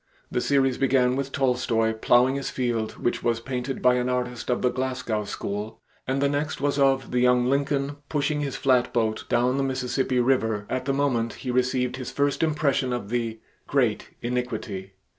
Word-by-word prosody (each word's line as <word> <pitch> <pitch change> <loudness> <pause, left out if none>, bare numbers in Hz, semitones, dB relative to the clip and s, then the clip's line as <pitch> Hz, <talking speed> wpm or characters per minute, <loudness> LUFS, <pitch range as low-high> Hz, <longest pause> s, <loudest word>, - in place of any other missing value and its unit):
The 125 - 0
series 135 -2 +2
began 130 -2 +3
with 135 0 -3
Tolstoy 125 -4 +1
plowing 120 +3 +4
his 140 0 -3
field 120 -4 -1
which 120 - -2
was 115 -1 +1
painted 130 +2 -4
by 125 0 +5
an 125 0 0
artist 125 -1 -2
of 125 - 0
the 125 - +3
Glasgow 130 -5 -2
school, 105 +2 -5 0.3
and 135 +1 0
the 140 - +3
next 145 +1 -2
was 140 +1 0
of 135 -2 +2
the 125 - +1
young 125 0 +4
Lincoln 140 +1 0
pushing 150 0 0
his 140 -2 -3
flatboat 120 -4 +1
down 125 +2 +2
the 140 - +1
Mississippi 130 -1 0
River 115 -5 +1
at 130 0 -1
the 135 - +1
moment 125 -5 0
he 125 - -5
received 125 0 0
his 130 -2 -5
first 140 0 0
impression 150 -5 +1
of 110 -5 -4
the 115 -2 -2 0.3
"great - - +1
iniquity." 120 -6 -3
125 Hz, 180 wpm, -25 LUFS, 120-135 Hz, 0.3 s, by